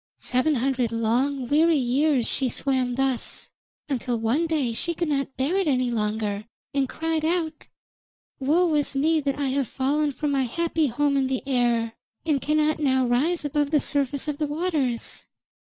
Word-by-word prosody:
Seven 260 +5 +1
hundred 250 -2 0
long 245 +4 0
weary 315 +4 +4
years 265 0 +2
she 265 -2 +1
swam 255 -1 -1
thus, 265 -2 -1 0.4
until 250 -4 -1
one 240 +9 +1
day 290 -8 0
she 340 +9 -2
could 340 -1 -1
not 275 -2 -2
bear 275 +8 0
it 385 -4 +1
any 255 -3 +1
longer, 210 -2 -2 0.3
and 275 -2 +1
cried 325 -1 -2
out: 320 -1 -1 0.7
'Woe 320 +5 +2
is 290 -1 0
me 315 +4 +3
that 275 -1 -1
I 280 -2 -1
have 270 -1 0
fallen 290 +5 0
from 285 +2 -2
my 270 -2 +1
happy 325 +3 0
home 280 +3 +1
in 265 -1 +2
the 260 -1 -2
air, 240 -4 +1 0.3
and 295 -4 +1
cannot 305 +1 +1
now 260 -3 +2
rise 295 +8 +1
above 290 0 0
the 300 0 +3
surface 280 0 0
of 295 -1 -3
the 300 - 0
waters. 295 -6 -2
275 Hz, 170 wpm, -25 LUFS, 250-305 Hz, 0.7 s, weary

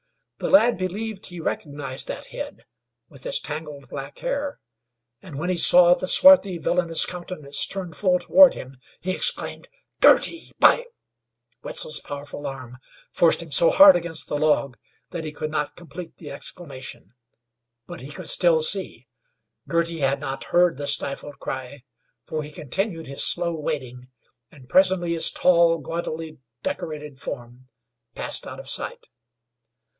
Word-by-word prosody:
The - - -2
lad 245 -8 +5
believed 200 +3 -4
he 175 -2 -9
recognized 145 -4 -3
that - - -7
head, - - -8 0.4
with - - -17
its - - 0
tangled 150 - -7
black 140 0 -8
hair, 280 +2 -3 0.6
and 155 -7 -10
when 175 +5 -2
he - - 0
saw 175 +1 +6
the 185 - -3
swarthy, 200 -8 +6
villainous 170 -1 +1
countenance 175 -5 -3
turned 180 -5 -6
full 180 +1 +2
toward 280 +8 +6
him, 130 +1 -10 0.2
he 185 - -1
exclaimed: - - -2 0.3
"Girty! 335 - +4
by 485 - +5 0.4
" - - -40
Wetzel's 485 -1 +1
powerful 145 0 -8
arm 130 -2 -8 0.3
forced - - +2
him - - -14
so - - +6
hard 295 - +8
against 170 -2 0
the 145 - -2
log 145 -4 +1 0.4
that 170 -2 -5
he 155 - -5
could 155 +1 -5
not 150 -2 -3
complete 175 0 -10
the 150 -4 -10
exclamation; 135 - -6 0.7
but - - -10
he 135 +3 -9
could - - -9
still - - +4
see. 475 - -1 0.6
Girty 170 0 -1
had 140 -1 +1
not 135 0 -5
heard 175 -4 +2
that 145 0 -5
stifled 140 +1 -1
cry, 130 0 -7 0.4
for 155 -1 -4
he 150 0 -9
continued 165 - -4
his 140 +1 -2
slow 170 -1 +2
wading, 130 -5 -5 0.4
and 130 -4 -17
presently 185 +2 +3
his 165 - +2
tall, 170 -2 +3
gaudily 160 0 -6 0.2
decorated 150 -3 -5
form 125 0 -8 0.5
passed - - -2
out - - -8
of - - -11
sight. - - -5
165 Hz, 150 wpm, -23 LUFS, 140-185 Hz, 0.7 s, hard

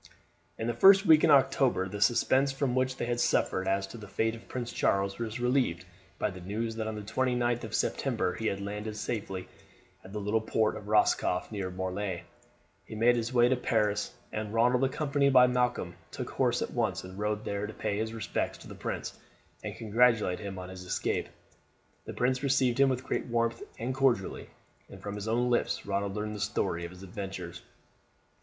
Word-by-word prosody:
'" - - -39
In 115 - -3
the 120 - 0
first 195 - +7
week 155 -3 +7
in - - +5
October 135 -8 +4
the 100 +2 -6
suspense 130 +5 +3
from 135 -2 -1
which 130 0 0
they - - -2
had 120 0 -1
suffered 95 -5 +1
as 95 0 +1
to 115 +4 -10
the 105 - -9
fate 110 +3 0
of 115 - -11
Prince 120 -2 -5
Charles 100 +1 +1
was 115 0 -3
relieved 125 -9 +1 0.3
by 105 - 0
the 95 -1 -10
news 110 +5 -3
that 110 -1 -2
on 110 - -3
the 105 - -6
29th 120 +1 0
of - - -4
September 90 -1 0
he 110 +4 -3
had 100 - 0 0.4
safely 100 -4 -3
landed - - -16 0.5
at 95 - -12
the 105 - -4
little 105 +2 0
port 110 0 +1
of 105 -1 -9
Roscoff 105 -3 +2
near 100 -3 -3
Morlaix. 95 0 -3 0.6
He - - -9
made 120 +3 +4
his 120 0 -2
way 120 -1 +5
to 130 - +3
Paris, 105 -4 0 0.2
and 105 -1 -3
Ronald, 125 +3 +3
accompanied 140 0 +1
by 125 -1 +8
Malcolm, 125 -7 0 0.2
took - - -6
horse - - +1
at - - -5
once - - 0
and 95 +1 -9
rode 105 0 -1
there 100 +1 -2
to 110 - -8
pay 105 -1 -2
his 110 0 -2
respects 115 -1 -2
to - - -13
the - - -8
prince, - - -5 0.4
and - - -5
congratulate 115 -4 +3
him 100 -3 -6
on 90 0 -7
his 95 -1 -8
escape. 90 - -1 0.8
The - - -6
prince 130 +1 +1
received 135 -3 +2
him 140 0 +6
with 130 -1 -1
great - - -2
warmth 115 -1 0 0.2
and 125 +3 -2
cordiality, 130 -7 +1 0.4
and - - -11
from 100 - -6
his 105 +1 -5
own 120 +2 +1
lips 120 - 0
Ronald 100 0 -1
learned 105 0 -3
the - - -6
story 95 -3 -1
of - - -6
his 90 +1 -12
adventures. 95 -2 -6
110 Hz, 205 wpm, -30 LUFS, 100-125 Hz, 0.8 s, by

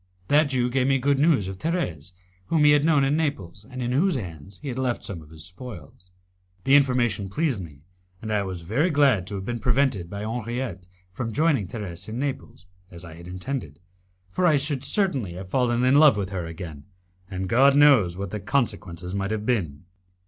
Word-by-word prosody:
That 150 +2 +5
Jew 125 -3 0
gave 130 0 +1
me 135 0 +3
good 140 +1 +1
news 145 - +3
of 95 -1 -7
Thérèse, 90 - -3 0.3
whom 160 -2 +2
he 150 - +7
had 145 -1 +4
known 150 -3 +4
in 135 +2 +2
Naples, 105 - -3
and 130 -1 -5
in 120 - -1
whose 165 +7 +2
hands 90 - -7
he 145 - -6
had 125 0 -4
left 125 -2 -1
some 90 -5 -6
of 75 - -16
his 80 -1 -10
spoils. 90 - -10 0.5
The 135 - +2
information 125 -8 +3
pleased 145 - 0
me, 75 -5 -11 0.4
and 110 0 -4
I 105 - +2
was 95 -3 -5
very 125 - +1
glad 140 - +3
to 100 - -4
have 95 -1 -5
been 120 +1 -3
prevented 125 -7 +1
by 100 +1 -6
Henriette 115 -4 -4 0.2
from 115 +4 -4
joining 140 - +1
Thérèse 95 -3 -7
in 110 - -5
Naples, 135 -9 -5 0.2
as 85 0 -11
I 85 - -10
had 85 +2 -12
intended, 90 - -5 0.5
for 180 - +2
I 155 - +5
should 140 -1 -1
certainly 140 - -1
have 90 +1 -8
fallen 125 -2 +1
in 130 +3 +5
love 150 -7 +7
with 100 -2 -2
her 90 -3 -3
again, 80 -4 -8 0.4
and 95 -1 -4
God 135 +7 +5
knows 130 -12 +5
what 100 -2 -5
the 105 - -3
consequences 95 -6 -2
might 100 0 -2
have 110 -1 -3
been. 90 - -1
115 Hz, 205 wpm, -25 LUFS, 90-140 Hz, 0.5 s, he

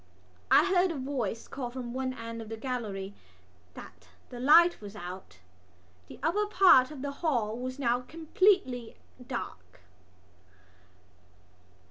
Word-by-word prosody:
I - - +6
heard 370 -1 +3
a 330 - -4
voice 255 -5 -3
call 255 -3 -5
from 240 -1 -7
one 260 0 -2
end 230 -1 -7
of 220 - -9
the 225 - -6
gallery 215 -6 -4 0.6
that 95 -1 -13 0.2
the 245 - -8
light 330 +5 +5
was 205 0 -9
out. 180 - -9 0.7
The - - -12
upper 410 +7 +1
part 370 -11 +6
of 290 -3 -9
the 285 - -3
hall 240 -10 0
was 255 +1 -5
now 245 -3 +1
completely 320 - 0 0.3
dark. 95 - -7
250 Hz, 130 wpm, -29 LUFS, 220-300 Hz, 0.7 s, I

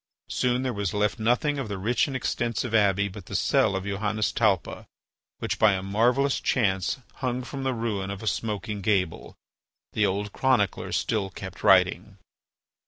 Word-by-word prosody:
Soon 125 0 0
there 130 -2 -1
was 100 -2 -2
left 105 +2 0
nothing 125 +6 +1
of 135 - -3
the 100 - -3
rich 110 +8 +1
and 135 - -5
extensive 120 -2 -2
abbey 100 -2 +3
but 95 -2 -10
the - - -6
cell 100 - +2
of 95 - -2
Johannes 105 +2 -1
Talpa, 100 -6 0 0.5
which, - - -3
by 110 -2 +5
a 95 -1 -2
marvellous 120 +8 +2
chance, 95 -6 +1 0.2
hung 125 -1 -2
from 135 +2 -6
the 130 -1 -1
ruin 105 -4 -2
of 100 +1 -6
a - - -5
smoking 105 -1 -2
gable. 95 -4 -1 0.6
The 105 -1 +2
old 100 +2 -3
chronicler 125 -8 +1
still 105 -4 0
kept 95 -1 -9
writing. 95 +2 +3
105 Hz, 170 wpm, -26 LUFS, 100-120 Hz, 0.6 s, by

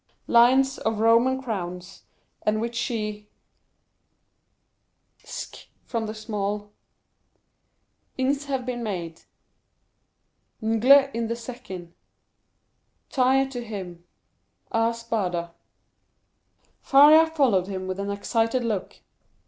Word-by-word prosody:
lions 260 +3 +4
of 220 -1 -1
Roman 230 +4 +4
crowns, 180 -5 -6 0.4
and 215 0 0
which 235 +1 -3
he 210 -3 -3 1.9
...ck - - -8 0.2
from 225 -2 -3
the 215 - -6
small 205 -1 -4 1.5
...ings 275 +2 0
have 265 -3 -3
been 245 -1 -4
made 175 -7 -5 1.4
...ngle 260 +6 +4
in 230 0 -2
the 230 - -2
second; 225 -8 -9 1.2
...tire 265 +1 +3
to 245 -2 -6
him 185 -6 -8 0.7
...ar 225 0 +2
† - - -7
Spada." 185 -7 -3 1.3
Faria 300 +4 +7
followed 260 - +2
him 190 -1 -5
with 185 +1 -4
an 200 0 -3
excited 225 +4 0
look. 215 -5 -4
225 Hz, 100 wpm, -25 LUFS, 200-255 Hz, 1.9 s, Faria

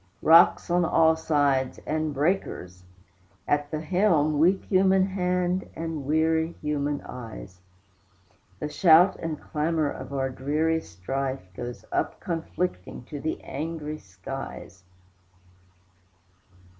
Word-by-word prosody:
Rocks 165 +1 +6
on 175 0 +3
all 160 -1 +4
sides, 145 -5 +1
and 155 0 -1
breakers! 140 - -2 0.6
at 145 0 +1
the 155 0 -3
helm 155 -4 +2
Weak 185 +5 +3
human 190 0 +4
hand 180 -1 -1
and 160 -3 -4
weary 160 +2 +1
human 145 -1 -2
eyes. 110 -7 -9 1.0
The - - -3
shout 170 +4 +5
and 160 -2 -4
clamor 155 -1 -1
of - - -8
our 135 -1 -1
dreary 155 +5 0
strife 130 - -5
Goes 120 +4 -7
up - - -1
conflicting 165 - -4
to 145 +4 -7
the 160 - -3
angry 155 +1 -5
skies. 95 -1 -8
155 Hz, 110 wpm, -26 LUFS, 135-165 Hz, 1.0 s, Rocks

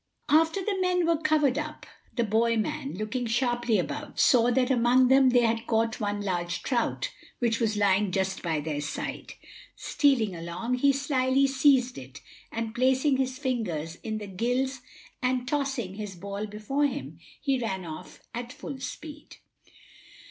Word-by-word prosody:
After 325 +5 +3
the 395 -3 -1
men 360 -1 +2
were 330 -1 +1
covered 300 -4 +2
up, 305 0 -6 0.3
the 240 - +2
boy 230 +2 +2
man, 225 +3 -2
looking 215 +5 -3
sharply 240 -1 +1
about, 295 - -4
saw 245 -1 +5
that 250 +1 +2
among 250 +1 +4
them 265 0 +6
they 245 -1 +4
had 230 0 0
caught 225 0 +1
one 205 -1 -2
large 175 -3 -2
trout, 240 -4 -1 0.3
which 230 -2 0
was 220 -3 0
lying 200 -1 +3
just 190 0 -1
by 160 -3 -1
their 145 -1 -3
side. 150 - -5 0.4
Stealing 240 -10 +1
along, 170 +8 -4
he 280 +2 +5
slyly 275 -1 +2
seized 265 - +3
it, 130 +3 -11 0.3
and 225 -1 -3
placing 260 +3 +2
his 260 -1 -1
fingers 210 - -2
in 220 -1 -4
the 210 - -6
gills 245 +7 -1 0.4
and 250 0 0
tossing 270 -9 -1
his 205 -1 -6
ball 200 +3 -5
before 215 +8 0
him, 160 - -6 0.2
he 275 -3 0
ran 190 -5 -3
off 155 -1 -9
at 240 +1 -5
full 280 -1 -7
speed. 300 +3 -8
240 Hz, 160 wpm, -27 LUFS, 205-270 Hz, 0.4 s, them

